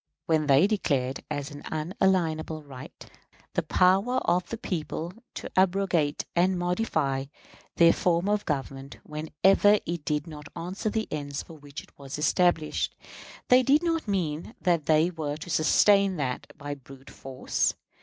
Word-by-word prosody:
When 155 -2 +1
they 140 +5 +6
declared 140 -11 -1
as 145 -2 -4
an 145 - -9
unalienable 160 -1 0
right 130 -3 -11 0.5
the - - +1
power 195 +7 +3
of 175 +1 +1
the 230 - -4
people 170 -3 -4 0.2
to - - -6
abrogate 185 -5 +1
and 180 +2 +3
modify 175 -7 -1 0.5
their 170 0 +6
form 175 +1 +1
of 210 0 +1
government 135 -2 -4
whenever 175 +7 +3
it 170 -2 -4
did 150 -1 -1
not 150 -2 -10
answer 180 +5 -3
the 220 0 -2
ends 145 -1 -4
for - - -13
which 145 -2 -10
it - - -22
was 140 0 -7
established, 165 0 +1 0.5
they 250 +1 +7
did 280 +6 +3
not 330 -6 -1
mean 175 - -2
that 170 -5 +1
they 160 +3 +4
were 150 -3 -4
to 165 +3 -8
sustain 195 +5 +4
that 130 -4 -3
by 145 0 -5
brute 135 0 -13
force. 130 -1 -2
160 Hz, 150 wpm, -27 LUFS, 145-190 Hz, 0.5 s, they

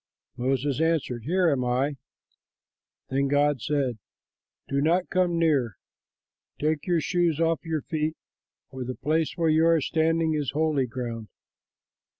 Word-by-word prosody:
Moses 135 +3 0
answered, 150 -8 0
"Here 180 +3 +2
am 130 -3 0
I." 130 +4 0 1.2
Then 140 +1 +1
God 145 -2 +2
said, 135 -5 -1 0.7
"Do 140 0 0
not 175 +4 +2
come 180 -2 +2
near; 140 - +1 0.8
take 155 +2 -1
your 175 -2 +2
shoes 170 -1 +1
off 165 -3 +1
your 160 -3 -2
feet, 155 -1 -2 0.5
for 130 -1 -5
the 125 +1 -5
place 155 +2 0
where 165 -2 +2
you 160 +1 +4
are 165 -1 +4
standing 160 +1 +1
is 150 -3 -1
holy 150 -4 +1
ground." 115 -2 -5
150 Hz, 140 wpm, -26 LUFS, 130-165 Hz, 1.2 s, you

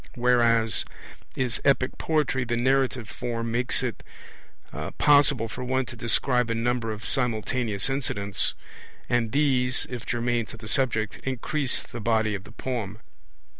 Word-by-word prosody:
Whereas 120 -2 +3 0.5
in 130 -2 -1
epic 135 -2 +2
poetry 150 -5 +1
the 120 -1 -1
narrative 130 -1 +1
form 115 -1 -4
makes 120 +1 +2
it - - -3 1.0
possible 145 -5 +4
for 125 - -6
one 130 +1 0
to 120 - -9
describe 120 +1 +2
a 115 - 0
number 115 0 0
of 110 0 -7
simultaneous 115 -3 -1
incidents; 105 -7 -1 0.5
and 120 -2 +1
these, 130 -3 +2
if 120 -2 -5
germane 120 -1 0
to - - -10
the 115 -1 -10
subject, 110 -2 +1
increase 130 +1 -1
the 120 - -8
body 110 -1 +1
of 100 -1 -5
the - - -12
poem. 110 -4 -4
120 Hz, 140 wpm, -26 LUFS, 115-130 Hz, 1.0 s, possible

